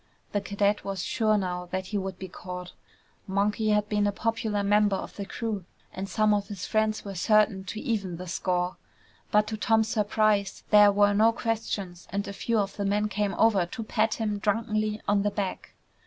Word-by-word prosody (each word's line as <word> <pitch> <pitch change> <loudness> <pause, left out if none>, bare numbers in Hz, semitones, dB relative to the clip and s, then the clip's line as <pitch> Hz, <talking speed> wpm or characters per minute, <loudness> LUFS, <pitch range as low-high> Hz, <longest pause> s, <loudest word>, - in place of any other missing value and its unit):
The 205 - 0
cadet 200 +1 0
was 195 -2 -3
sure 215 -3 +2
now 180 -2 -3
that 185 0 -2
he - - +2
would 190 -1 -5
be 190 - -7
caught. 180 0 -8 0.5
Monkey 205 +3 +1
had 210 0 +2
been 210 -1 +1
a - - +2
popular 220 -1 -1
member 205 0 +3
of - - -6
the 200 -1 -5
crew 220 -4 -3 0.3
and 195 +1 -5
some 215 -1 +3
of 205 -1 0
his 200 -3 -6
friends 215 0 0
were 200 - -5
certain 200 +1 +3
to 215 +3 -5
even 200 -9 -2
the 180 - -7
score. 180 +1 -1 0.5
But 210 0 +4
to 220 0 -4
Tom's 220 0 +2
surprise, 210 -2 +1
there 210 -1 +8
were 205 0 +4
no 220 +3 +5
questions 215 -6 -3
and 200 +1 -2
a 200 - -5
few 230 +3 -1
of 200 -2 -1
the 200 - -1
men 210 +1 +1
came 205 0 -1
over 205 -6 +3
to 225 +6 -6
pat 220 0 +1
him 210 -2 -2
drunkenly 215 0 0
on 205 0 +3
the 205 - +1
back. 200 -2 -4
205 Hz, 200 wpm, -27 LUFS, 195-215 Hz, 0.5 s, there